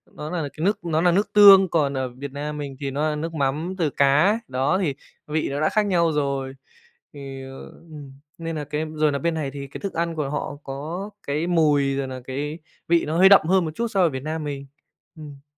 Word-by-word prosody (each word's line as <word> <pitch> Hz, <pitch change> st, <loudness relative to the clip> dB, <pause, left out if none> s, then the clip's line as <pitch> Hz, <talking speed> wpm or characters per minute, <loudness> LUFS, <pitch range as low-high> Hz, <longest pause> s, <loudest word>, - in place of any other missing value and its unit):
nó 150 Hz, +1 st, -6 dB
là 175 Hz, -2 st, -2 dB
cái 160 Hz, +3 st, -4 dB
nước 205 Hz, -, +1 dB
nó 160 Hz, -1 st, +1 dB
là 175 Hz, 0 st, +4 dB
nước 200 Hz, +4 st, 0 dB
tương, 195 Hz, -3 st, +8 dB
còn 145 Hz, -4 st, +1 dB
ở 130 Hz, -1 st, -2 dB
Việt 135 Hz, +3 st, -8 dB
Nam 150 Hz, +1 st, -5 dB
mình 140 Hz, -2 st, -6 dB
thì 140 Hz, -1 st, -3 dB
nó 150 Hz, +3 st, 0 dB
là 150 Hz, -, -2 dB
nước 165 Hz, +2 st, -4 dB
mắm 155 Hz, +6 st, -1 dB
từ 160 Hz, -4 st, +1 dB
cá, 150 Hz, +12 st, +3 dB
đó, 135 Hz, +8 st, 0 dB
thì 145 Hz, -7 st, -1 dB, 0.3 s
vị 155 Hz, 0 st, -1 dB
nó 140 Hz, +1 st, -3 dB
đã 155 Hz, -, +3 dB
khác 215 Hz, -1 st, +1 dB
nhau 170 Hz, -4 st, +2 dB
rồi. 140 Hz, -2 st, -2 dB, 0.6 s
Thì, 135 Hz, -2 st, -8 dB
ờ, 135 Hz, 0 st, -10 dB
ừm, 150 Hz, -5 st, -12 dB, 0.3 s
nên 165 Hz, -1 st, -4 dB
nà 150 Hz, -, -3 dB
cái 150 Hz, +2 st, -3 dB
rồi 155 Hz, -1 st, +2 dB
nà 140 Hz, -, -1 dB
bên 170 Hz, +1 st, -1 dB
này 145 Hz, -4 st, -3 dB
thì 140 Hz, 0 st, -7 dB
cái 135 Hz, -, -9 dB
thức 200 Hz, -, -5 dB
ăn 170 Hz, 0 st, -1 dB
của 140 Hz, -3 st, -2 dB
họ 145 Hz, 0 st, -4 dB
có 160 Hz, +9 st, -6 dB, 0.2 s
cái 150 Hz, +4 st, -1 dB
mùi, 145 Hz, -5 st, +2 dB
rồi 135 Hz, -1 st, -2 dB
nà 130 Hz, -1 st, -7 dB
cái 145 Hz, +5 st, -4 dB, 0.3 s
vị 170 Hz, 0 st, +3 dB
nó 155 Hz, +2 st, -2 dB
hơi 190 Hz, +1 st, +8 dB
đậm 195 Hz, -5 st, +6 dB
hơn 185 Hz, 0 st, +3 dB
một 155 Hz, -, -3 dB
chút 235 Hz, 0 st, -2 dB
so 195 Hz, -3 st, 0 dB
ở 170 Hz, -, +5 dB
Việt 130 Hz, -2 st, -5 dB
Nam 155 Hz, 0 st, -4 dB
mình. 140 Hz, -1 st, -5 dB, 0.5 s
Ừm. 145 Hz, -3 st, -11 dB
150 Hz, 245 wpm, -23 LUFS, 140-170 Hz, 0.6 s, tương